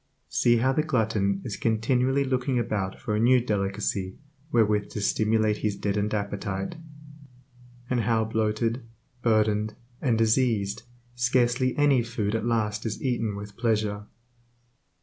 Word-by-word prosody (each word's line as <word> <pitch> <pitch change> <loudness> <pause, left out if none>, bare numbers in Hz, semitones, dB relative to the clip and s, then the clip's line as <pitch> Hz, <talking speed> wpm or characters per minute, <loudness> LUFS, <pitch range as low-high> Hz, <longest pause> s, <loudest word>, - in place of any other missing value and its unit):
See 120 -1 +3
how 130 +3 +2
the 155 - +2
glutton 110 -9 0
is 105 -5 -4
continually 125 +5 +1
looking 130 -1 0
about 105 -5 -2
for 110 -5 -2
a - - 0
new 125 +3 +5
delicacy 100 -3 -2 0.3
wherewith 105 -5 +2
to - - -3
stimulate 110 +1 +1
his 105 -1 -1
deadened 105 +1 -1
appetite; 100 - -3 1.1
and 125 -1 0
how, 110 0 +1
bloated, 110 +2 0 0.4
burdened, 110 -2 +1 0.3
and 120 -4 +2
diseased, 110 -3 +1 0.3
scarcely 125 +1 +1
any 145 -4 +4
food 115 -3 -2
at 115 +1 -1
last 110 -2 0
is 110 -2 -3
eaten 115 -5 -1
with 100 0 -8
pleasure. 105 -3 0
110 Hz, 130 wpm, -26 LUFS, 105-120 Hz, 1.1 s, new